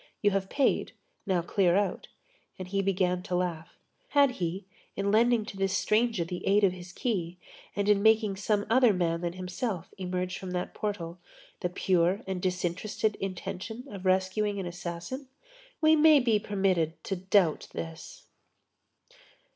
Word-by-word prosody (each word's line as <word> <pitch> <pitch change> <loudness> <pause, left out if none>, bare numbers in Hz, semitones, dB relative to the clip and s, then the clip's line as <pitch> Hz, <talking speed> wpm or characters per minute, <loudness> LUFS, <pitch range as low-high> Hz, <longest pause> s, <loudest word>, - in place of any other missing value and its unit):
You 205 - +4
have 195 0 -1
paid, 280 -2 +1 0.3
now 180 -3 +1
clear 175 0 +2
out." 200 -2 0 0.5
And 185 -1 -7
he 195 +1 0
began 185 -2 +1
to 180 -1 -3
laugh. 175 -3 -3 0.3
Had 285 - +4
he, 185 -3 -3 0.3
in 200 0 0
lending 230 0 +3
to 195 - -8
this 195 0 +1
stranger 220 -3 +2
the 175 +1 -6
aid 205 +1 +4
of 195 - +5
his 180 -1 -10
key, 180 -6 -2 0.4
and 200 0 0
in 205 -1 +4
making 220 -2 +4
some 205 0 0
other 245 -1 +5
man 170 -2 0
than 175 -1 -2
himself 185 +1 -4
emerge 185 0 -3
from 190 - -6
that 180 0 -3
portal, 180 -5 -4 0.4
the 180 - -1
pure 180 +2 +1
and 190 -1 -3
disinterested 185 +4 -1
intention 195 +4 -5
of 195 -2 -8
rescuing 190 +2 +1
an 190 - -3
assassin? 175 +9 -6 0.5
We 315 0 +6
may 310 -1 +7
be 230 -5 +2
permitted 190 -6 0
to 195 - -2
doubt 185 -2 +2
this. 165 0 -7
190 Hz, 155 wpm, -29 LUFS, 180-210 Hz, 0.5 s, may